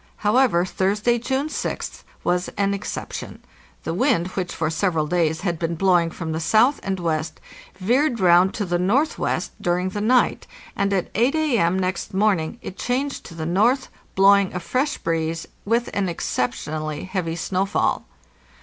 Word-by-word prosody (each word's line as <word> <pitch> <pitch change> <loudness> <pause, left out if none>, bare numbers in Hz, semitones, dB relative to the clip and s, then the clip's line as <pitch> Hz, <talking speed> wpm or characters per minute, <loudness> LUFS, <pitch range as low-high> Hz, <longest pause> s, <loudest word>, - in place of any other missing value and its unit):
However, 210 -5 +3
Thursday, 210 +6 +1
June 265 +5 -1
6th, - - -4 0.2
was 180 0 +1
an 200 0 +1
exception. 200 - -5 0.4
The 165 - -2
wind, 195 -4 +1
which 185 -1 -3
for 160 -1 -2
several 165 -2 0
days 160 -1 0
had 175 -4 -2
been 170 0 -1
blowing 175 -1 +3
from 165 0 -5
the 160 - -2
south 220 - +3
and 190 -1 -2
west, 160 -2 -2 0.4
veered 240 +7 +1
round 180 +1 +5
to 205 - -2
the 175 -1 0
northwest 245 - 0
during 180 +1 0
the 205 +2 -4
night, 245 +3 +2 0.3
and 200 0 0
at 190 -3 -1
8 245 +8 +2
A.M. 235 - +2
next 185 0 -2
morning 195 -2 +1
it 185 - -8
changed 270 +3 -2
to 165 - -10
the 160 -1 -4
north, 215 +10 +2 0.3
blowing 195 0 +5
a - - -1
fresh 255 - -1
breeze, 165 0 -2 0.2
with 235 +3 +1
an 195 -2 0
exceptionally 155 +1 -3
heavy 185 -3 -3
snowfall. 190 +3 0
185 Hz, 160 wpm, -23 LUFS, 170-225 Hz, 0.4 s, round